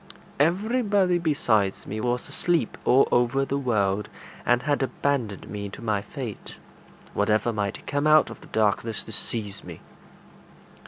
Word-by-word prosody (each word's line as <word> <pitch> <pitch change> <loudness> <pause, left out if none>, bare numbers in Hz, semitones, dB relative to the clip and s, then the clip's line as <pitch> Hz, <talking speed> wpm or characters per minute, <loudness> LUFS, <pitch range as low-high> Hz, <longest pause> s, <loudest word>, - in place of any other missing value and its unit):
Everybody 200 - +2
besides 120 - +1
me 110 - -4
was 125 +1 -1
asleep 175 -3 0
all 130 - +5
over 120 +3 +2
the 140 +1 -1
world, 105 -6 0 0.4
and 120 0 +3
had 145 -2 +1
abandoned 130 -6 -1
me 100 -1 -5
to - - -10
my 105 -3 0
fate, 115 +1 -7 0.6
whatever 105 +3 +1
might 100 -2 -3
come 145 +1 0
out 155 0 +5
of - - -11
the - - -14
darkness 110 0 0
to - - -10
seize 105 -2 -2
me. - - -9
120 Hz, 145 wpm, -25 LUFS, 105-145 Hz, 0.6 s, all